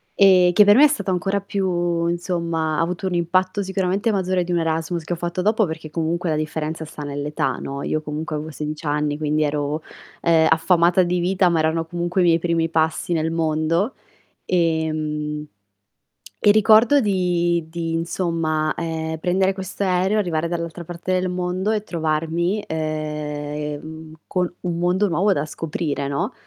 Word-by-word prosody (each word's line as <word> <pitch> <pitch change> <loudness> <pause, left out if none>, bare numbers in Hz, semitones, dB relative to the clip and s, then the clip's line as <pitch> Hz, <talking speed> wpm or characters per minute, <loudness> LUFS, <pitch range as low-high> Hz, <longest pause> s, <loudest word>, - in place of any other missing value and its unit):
e 185 -3 +6
che 210 - +8
per 205 0 +7
me 285 +5 +8
è - - +7
stato 280 -9 -2
ancora 195 +2 0
più 175 -4 -1
insomma, 170 -3 -1
ha - - +3
avuto 180 +3 -2
un 185 - -2
impatto 185 +3 +1
sicuramente 190 +3 0
maggiore 185 -2 0
di 175 - -5
un 175 - +2
Erasmus, 165 +1 -1
che 165 - -3
ho - - -4
fatto 175 +2 -3
dopo, 215 +1 +3
perché 160 -1 -7
comunque 170 +2 -1
la - - +1
differenza 155 +1 -3
sta 150 -1 -8
nell'età, 145 +1 -2
no. 140 0 -5
Io 155 - -1
comunque 155 +1 -4
avevo 155 +1 -5
16 150 +1 -5
anni 145 0 0
quindi 155 0 +1
ero, 150 +1 -1 0.4
ehm, 165 -1 +4
affamata 170 +2 +4
di 175 0 0
vita 185 +2 +2
ma 170 -2 +1
erano 160 +1 +1
comunque 175 +2 -1
i - - +4
miei 165 -1 +4
primi 165 -1 0
passi 160 +2 0
nel 160 -1 0
mondo, 165 +6 0 0.5
ehm, 155 -3 -1 1.0
e 205 - +7
ricordo 220 +6 +6
di 175 -5 +1
di, 165 -1 -3
insomma, 165 -2 -1
ehm, 160 -1 -3
prendere 190 +3 +1
questo 190 +1 -4
aereo, 190 +3 +2
arrivare 170 -5 0
dall'altra 170 0 -4
parte 175 +2 -4
del 185 0 +1
mondo 180 +2 -1
e 215 -1 0
trovarmi, 165 +3 -1
ehm, 150 0 -4
col 180 -1 -1
un 175 -2 -2
mondo 180 +4 +2
nuovo 190 +4 +2
da 145 -3 -1
scoprire, 150 -2 -3
no. 140 0 -2
170 Hz, 170 wpm, -22 LUFS, 155-180 Hz, 1.0 s, che